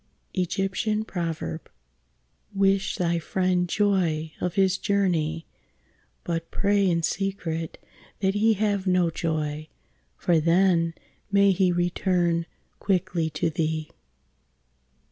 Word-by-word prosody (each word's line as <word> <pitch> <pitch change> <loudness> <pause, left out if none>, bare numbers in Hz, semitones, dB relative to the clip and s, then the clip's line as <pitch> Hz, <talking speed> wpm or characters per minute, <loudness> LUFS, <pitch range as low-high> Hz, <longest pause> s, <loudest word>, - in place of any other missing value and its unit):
Wish 195 0 +2
thy 170 -1 0
friend 180 +1 0
joy 170 -6 +1
of 180 -1 -2
his 190 -1 +3
journey, 170 -6 0 0.8
but 165 -1 -3
pray 200 -1 +2
in 170 -1 +1
secret 165 -2 -2 0.4
that 195 0 +1
he 220 +2 +3
have 200 -2 0
no 180 -2 +3
joy, 155 -2 -2 0.5
for 170 -2 +2
then 165 0 +3 0.4
may 200 0 +5
he 185 -1 +2
return 175 -1 +1 0.3
quickly 180 -4 0
to 155 +2 -1
thee. 155 0 -2
175 Hz, 95 wpm, -25 LUFS, 165-195 Hz, 0.8 s, may